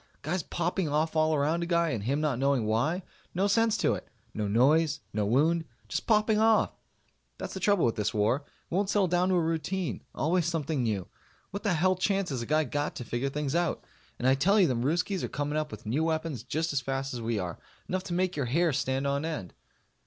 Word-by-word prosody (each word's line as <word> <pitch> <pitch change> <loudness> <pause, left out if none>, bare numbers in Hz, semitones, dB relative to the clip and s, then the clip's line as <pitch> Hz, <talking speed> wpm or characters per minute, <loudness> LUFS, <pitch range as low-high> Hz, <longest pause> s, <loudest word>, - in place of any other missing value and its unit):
Guys 170 +5 -1
popping 175 +1 -1
off 155 +2 0
all 155 0 +3
around 155 +4 +1
a 170 - -2
guy 170 -1 +2
and 110 -7 -3
him 140 +4 +1
not 150 -5 0
knowing 135 -4 +2
why. 145 - 0 0.3
No 190 +3 +2
sense 225 +2 +3
to - - +2
it. - - -6 0.3
No 105 -1 -2
noise. 140 +9 +3
No 105 -1 0
wound. 160 +8 +3 0.2
Just - - -3
popping 215 -1 +3
off. 220 0 +4 0.6
That's - - -6
the - - -4
trouble 200 -5 +3
with 115 -1 0
this 105 -1 0
war. 105 +4 +2
It 145 +3 -16
won't 195 +2 +1
settle 200 -2 +3
down 180 +1 +2
to 185 - +3
a - - +4
routine. 165 +2 -2
Always 170 +2 +1
something 160 -4 -1
new. 105 -6 -1 0.4
What 200 - -4
the 205 -5 +1
hell 185 +3 +3
chance 195 -1 0
has 130 -3 -2
a 115 - -5
guy 155 +1 +3
got 145 +1 -2
to 125 - -6
figure 120 +4 -2
things 145 0 -2
out? 170 0 0 0.3
And 125 - 0
I 130 - +6
tell 195 +11 +3
you 190 - +6
them 120 -2 0
Ruskies 175 +5 0
are - - -3
coming 145 +1 -2
up 155 0 -1
with - - -10
new 135 +9 0
weapons 160 -6 -1
just 155 +6 -2
as 140 - +1
fast 135 +1 -3
as 120 - -4
we 115 0 -1
are. 90 -3 -4 0.3
Enough 185 +1 -2
to 175 - -4
make 185 0 0
your 140 -4 -1
hair 165 +5 +2
stand 130 +1 -1
on 140 +1 0
end. 155 - -4
155 Hz, 230 wpm, -29 LUFS, 130-175 Hz, 0.6 s, I